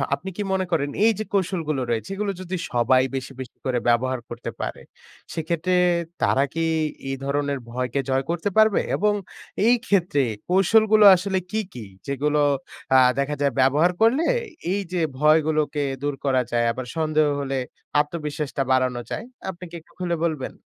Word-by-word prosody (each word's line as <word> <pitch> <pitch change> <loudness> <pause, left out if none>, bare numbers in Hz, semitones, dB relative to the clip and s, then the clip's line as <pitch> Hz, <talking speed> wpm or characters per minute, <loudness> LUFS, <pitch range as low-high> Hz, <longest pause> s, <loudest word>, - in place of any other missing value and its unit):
আপনি 190 - -8
কি 205 - -1
মনে 190 -1 0
করেন, 145 -3 +1 0.2
এই 225 - +6
যে 215 - -1
কৌশলগুলো 165 -7 0
রয়েছে, 115 +9 -2
এগুলো 205 0 -1
যদি 185 0 -4 0.2
সবাই 125 +2 +3
বেশি, 135 +1 -4
বেশি 125 - -10
করে 125 -2 +1
ব্যবহার 130 +2 +1
করতে - - -6
পারে, - - -4 0.5
সেক্ষেত্রে 170 +2 -1 0.5
তারা 135 - +3
কি 165 - -2 0.5
এই 135 - -1
ধরনের 140 0 -1
ভয়কে 125 +2 -2
জয় 135 +1 +1
করতে 175 +4 -1
পারবে? 215 -2 +5
এবং 210 +1 +2 0.5
এই 245 - +6
ক্ষেত্রে 180 -6 +2 0.3
কৌশলগুলো 215 +3 +5
আসলে 190 +1 -1
কি, 220 - 0
কি? 115 -4 -8 0.2
যেগুলো 145 +2 0 0.6
আ - - +9 0.2
দেখা 140 +2 0
যায় 140 -2 +2
ব্যবহার 150 +7 +4
করলে 260 +9 +4 0.5
এই 200 +1 0
যে 175 - 0 0.2
ভয়গুলোকে 155 0 +2 0.2
দূর 145 -1 -1
করা 130 -2 +3
যায় 120 0 +2
আবার 125 +1 -5
সন্দেহ 155 -1 +2
হলে 135 -1 -2 0.4
আত্মবিশ্বাসটা 150 -2 -2
বাড়ানো 130 -2 +2
যায়, - - -4 0.2
আপনি 180 0 -8
কি 170 - -10
একটু - - -27
খুলে 175 -1 0
বলবেন? 155 -6 -3
150 Hz, 160 wpm, -23 LUFS, 135-185 Hz, 0.6 s, আ